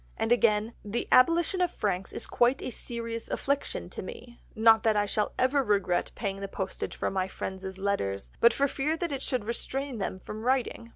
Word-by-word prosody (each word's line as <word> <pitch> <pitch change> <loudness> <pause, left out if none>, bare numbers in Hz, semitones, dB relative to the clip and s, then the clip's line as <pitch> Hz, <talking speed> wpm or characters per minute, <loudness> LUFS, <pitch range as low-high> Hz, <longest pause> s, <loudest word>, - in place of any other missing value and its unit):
And 225 - -1
again, 225 -2 +3
"The 210 +3 -2
abolition 335 +7 +4
of 355 - +3
franks 195 - -2
is - - -4
quite 245 +3 +2
a - - -3
serious 230 -1 -5
affliction 280 +1 -1
to - - -5
me, 350 - -10 0.2
not 225 0 +6
that 220 -1 +3
I 205 0 +3
shall 210 +1 -1
ever 270 +2 +3
regret 200 -5 +1
paying 195 -3 -3
the 195 - -3
postage 190 -1 -4
for - - -1
my 190 -1 0
friends' 190 0 -6
letters, 190 - -2
but 235 - +7
for 280 +4 +2
fear 295 +4 -1
it 290 -6 -2
should 250 -6 -1
restrain 260 +2 -3
them 190 - -2
from 210 +3 -8
writing. 245 -1 0
230 Hz, 190 wpm, -29 LUFS, 200-260 Hz, 0.2 s, but